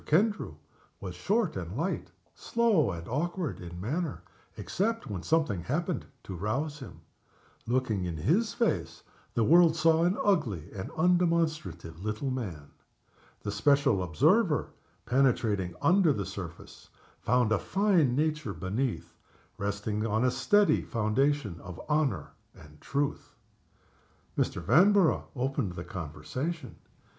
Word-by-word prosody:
Kendrew 205 +7 +1 0.4
was - - -6
short - - 0
and - - -5
light - - -2 0.2
slow 225 - +2
and 85 -1 -6
awkward 170 +5 -2
in 85 -1 -8
manner, 150 - -3 0.3
except 225 +4 -1
when 100 -5 -5
something 150 - +1
happened 165 - -2 0.2
to 95 - -7
rouse 135 - -2
him. 130 - -10 0.7
Looking 115 -6 0
in 85 -2 -3
his 180 - +2
face, 155 - -1 0.3
the 115 - +3
world 165 +4 +6
saw 165 0 +4
an 180 +3 +2
ugly 115 - 0
and 95 -2 -5
undemonstrative 160 - +1
little 110 +6 -2
man. 90 - -5 0.7
The 100 - -2
special 140 0 +3
observer, 85 -4 +2 0.4
penetrating 115 -7 +1
under 180 -2 +5
the 100 -5 -3
surface, 95 -3 -9 0.3
found 125 -2 +2
a 110 - +3
fine 185 -10 +2
nature 150 -7 -1
beneath, 110 +7 -3 0.5
resting 105 +2 -2
on 110 +3 +1
a 125 - +3
steady 205 +9 +3
foundation 120 - 0
of 90 0 -9
honor 150 -2 0 0.2
and 75 0 -16
truth. 140 +1 -2 1.0
Mr. 90 - -1
Vanborough 180 - +4
opened 130 -6 -1
the 85 - -6
conversation. 110 - -5
130 Hz, 125 wpm, -29 LUFS, 100-165 Hz, 1.0 s, world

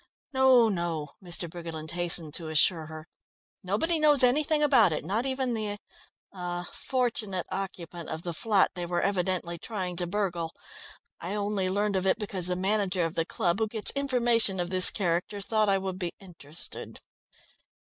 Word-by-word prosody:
"No, 260 -3 +5
no," 170 -6 -2
Mr. 175 -1 0
Briggerland 165 -2 -7
hastened 170 -3 +3
to 160 -1 -4
assure 160 +1 +3
her. 155 0 -9 0.5
"Nobody 315 - 0
knows 295 -3 +4
anything 300 +4 +3
about 250 - +5
it, 155 - -3
not 220 +9 -1
even 260 -2 -1
the 210 -2 -2 0.6
er 175 -1 -4
fortunate 225 -8 -2
occupant 175 -3 -6
of 160 +1 -5
the 175 - -4
flat 205 +3 +2
they 175 -2 -5
were 175 0 -1
evidently 180 -3 -1
trying 185 -4 -4
to 175 0 +1
burgle. 175 -4 -2 0.6
I 180 +5 -4
only 200 -2 -1
learnt 205 +1 0
of 190 0 0
it 190 - +3
because 195 -5 0
the 180 - 0
manager 190 -1 +1
of 165 - -3
the 165 - -1
club, 180 -1 -1
who 220 - +1
gets 220 0 +3
information 240 -7 +2
of 175 0 -2
this 185 -1 +7
character, 180 +1 -1
thought 215 +1 +1
I 195 - +3
would 190 -1 -4
be 175 -3 -3
interested." 170 -4 -5
190 Hz, 165 wpm, -28 LUFS, 175-215 Hz, 0.6 s, this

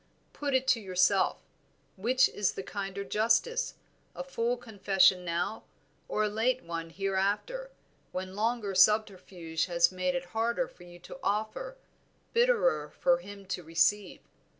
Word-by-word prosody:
Put 285 -2 -1
it 260 0 +2
to 250 - +4
yourself, 185 -1 +2 0.6
which 250 +7 +3
is 205 -2 -1
the 195 - -6
kinder 200 0 -5
justice, 235 - +1 0.4
a - - -4
full 245 -2 -1
confession 195 -5 +3
now, 175 +5 -2 0.5
or 215 - 0
a - - +2
late 235 +5 0
one 165 -1 -5
hereafter, 200 - -1 0.4
when 185 0 -5
longer 220 -1 -1
subterfuge 185 -5 +2
has 170 0 +3
made 185 -1 -1
it 175 0 -2
harder 235 +3 0
for 175 - -16
you 175 0 -13
to 265 - -11
offer, 220 - -2 0.6
bitterer 455 - +2
for 175 0 +2
him 200 +2 -11
to - - -2
receive? 175 +5 +1
200 Hz, 140 wpm, -30 LUFS, 185-235 Hz, 0.6 s, to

